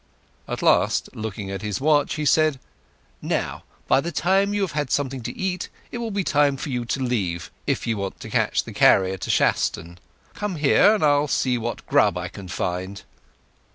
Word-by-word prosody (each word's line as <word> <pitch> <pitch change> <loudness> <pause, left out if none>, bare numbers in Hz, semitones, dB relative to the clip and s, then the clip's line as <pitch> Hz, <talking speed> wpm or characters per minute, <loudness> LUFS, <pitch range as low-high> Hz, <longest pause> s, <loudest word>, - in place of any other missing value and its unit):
At - - -4
last, - - +3
looking 105 -2 -5
at 95 - -5
his 105 -2 -3
watch, 145 0 +2
he 150 - -3
said, 155 -2 +3 0.6
"Now, - - -2 0.2
by 135 - +4
the 170 - -4
time 190 +5 +2
you 205 0 -1
have 195 - -1
had 150 -3 -2
something 135 -2 -1
to - - -6
eat, 185 -1 -2 0.2
it 240 - -5
will 230 -1 -3
be 200 -2 -1
time 145 -4 +2
for 145 - -5
you 125 -2 -2
to 125 - -2
leave, 95 -9 -2 0.2
if - - 0
you 115 -2 -1
want 100 -1 -5
to - - -8
catch - - +1
the - - -9
carrier 95 0 +4
to - - -6
Shaston. 85 +2 0 0.3
Come 210 -3 -3
here, 155 +8 +5
and 210 - -2
I'll 145 0 +3
see 130 -2 +1
what 120 +1 -5
grub 100 -4 +3
I 90 0 -4
can 100 0 -10
find." 90 +2 -4
135 Hz, 195 wpm, -23 LUFS, 100-155 Hz, 0.6 s, here